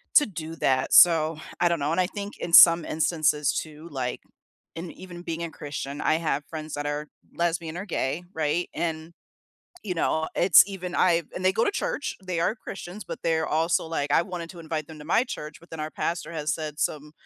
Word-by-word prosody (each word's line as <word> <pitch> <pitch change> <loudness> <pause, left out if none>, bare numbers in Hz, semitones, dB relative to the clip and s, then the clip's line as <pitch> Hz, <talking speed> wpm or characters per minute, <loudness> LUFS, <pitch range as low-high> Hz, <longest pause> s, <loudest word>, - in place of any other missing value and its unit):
to 295 - +8
do 165 -5 -7
that, 130 0 +1
so 165 -2 +6 0.2
I 175 - +4
don't 170 -1 0
know, 145 +2 -1
and 170 - +1
I 180 - +1
think 205 +1 -7
in 170 - -5
some 170 -1 +9
instances 155 -2 +1
too, 155 +1 -6
like, 130 -3 -3 0.5
and 165 +1 -6
even 175 -2 -10
being 165 -1 -4
a 165 - -4
Christian, 145 -1 -6
I - - +3
have 150 -3 -1
friends 155 -1 -6
that 145 0 -4
are 145 +1 -3 0.3
lesbian 170 -1 -1
or 190 - -5
gay, 165 -2 -2
right? 160 +2 -1
And, 160 0 -3 0.7
you 185 -4 -3
know, 160 -1 0
it's 175 -1 +8
even 185 -3 -6
I've 170 -2 +3
and 180 - -5
they 185 - +4
go 225 - +2
to - - +2
church, 295 - -2
they 180 -2 -3
are 170 - +1
Christians, 200 -2 -8
but - - -7
they're 160 -1 +1
also 160 +1 +1
like, 145 -3 -2
"I - - +5
wanted 170 -2 -6
to 175 -2 -11
invite 155 -2 -4
them 160 -1 -11
to - - -10
my 230 +9 +3
church, 150 - -7
but 170 - -19
then 160 -1 -6
our 155 - -3
pastor 170 +2 -3
has 155 -2 -1
said 155 -2 -6
some 150 0 -2
165 Hz, 215 wpm, -26 LUFS, 155-175 Hz, 0.7 s, some